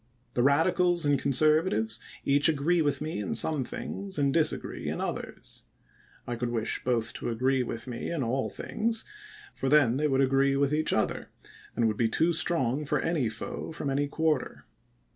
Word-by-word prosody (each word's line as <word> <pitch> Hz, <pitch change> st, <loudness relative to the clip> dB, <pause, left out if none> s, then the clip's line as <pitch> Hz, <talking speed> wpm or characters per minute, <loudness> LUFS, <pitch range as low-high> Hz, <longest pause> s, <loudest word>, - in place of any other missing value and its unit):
The 120 Hz, -, +1 dB
Radicals 170 Hz, +5 st, +3 dB
and 145 Hz, -2 st, +3 dB
Conservatives 150 Hz, -5 st, +2 dB, 0.3 s
each 145 Hz, +3 st, +4 dB
agree 160 Hz, +3 st, +2 dB
with 145 Hz, -2 st, 0 dB
me 155 Hz, -4 st, -3 dB
in 105 Hz, +2 st, -3 dB
some 140 Hz, +4 st, +2 dB
things 195 Hz, +8 st, -6 dB
and 140 Hz, -2 st, +1 dB
disagree 155 Hz, -1 st, +1 dB
in -, -, -3 dB
others. -, -, -6 dB, 0.6 s
I 120 Hz, -, -3 dB
could 120 Hz, +1 st, -3 dB
wish 115 Hz, -2 st, -2 dB
both 120 Hz, -2 st, -1 dB
to -, -, -4 dB
agree 130 Hz, +3 st, +1 dB
with 115 Hz, -2 st, -5 dB
me 120 Hz, -2 st, -5 dB
in 165 Hz, -5 st, -2 dB
all 130 Hz, +3 st, -1 dB
things; 225 Hz, 0 st, -2 dB, 0.5 s
for 135 Hz, -, -2 dB
then 135 Hz, -4 st, +4 dB
they 150 Hz, +1 st, +1 dB
would 135 Hz, -1 st, +2 dB
agree 135 Hz, +1 st, +3 dB
with 140 Hz, +1 st, +1 dB
each 155 Hz, +1 st, 0 dB
other, -, -, -1 dB, 0.5 s
and 115 Hz, -, +2 dB
would 110 Hz, -1 st, -1 dB
be 115 Hz, -2 st, +2 dB
too 165 Hz, +8 st, +2 dB
strong 150 Hz, -5 st, +2 dB
for 145 Hz, -, 0 dB
any 155 Hz, -9 st, 0 dB
foe 110 Hz, +7 st, -6 dB
from 145 Hz, -3 st, -4 dB
any 145 Hz, +1 st, 0 dB
quarter. 155 Hz, -2 st, -1 dB
140 Hz, 180 wpm, -28 LUFS, 125-155 Hz, 0.6 s, each